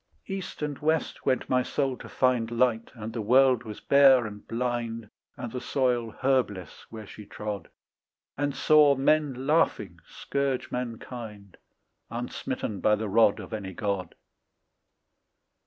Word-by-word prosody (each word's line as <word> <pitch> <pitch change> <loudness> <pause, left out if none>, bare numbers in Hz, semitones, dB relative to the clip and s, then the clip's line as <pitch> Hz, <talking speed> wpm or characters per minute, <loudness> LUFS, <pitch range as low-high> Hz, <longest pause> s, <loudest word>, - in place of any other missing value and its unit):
East 190 -5 -6
and 145 -2 -3
west 160 +1 -1
went 130 - +1
my 130 0 +2
soul 135 0 -1
to - - -11
find 125 -3 +1
Light, 115 -1 +1
and 110 -1 -7
the 115 - -3
world 130 +2 +4
was 105 -1 -7
bare 135 -3 +6
and 105 -1 -9
blind 115 -2 -3 0.3
And 120 - -6
the 125 - -5
soil 125 -4 0
herbless 125 - -1
where 110 -1 -9
she 105 - -11
trod 105 -4 -6 0.7
And 145 0 -1
saw 150 -2 +5
men 135 -1 +1
laughing 155 +3 +1
scourge 140 -2 -2
mankind, 115 -4 -6 0.5
Unsmitten 120 -3 -4
by 105 +3 +3
the 110 +1 -4
rod 105 0 +4
Of - - -9
any 100 -3 -5
God. 100 -4 -3
120 Hz, 140 wpm, -27 LUFS, 110-135 Hz, 0.7 s, bare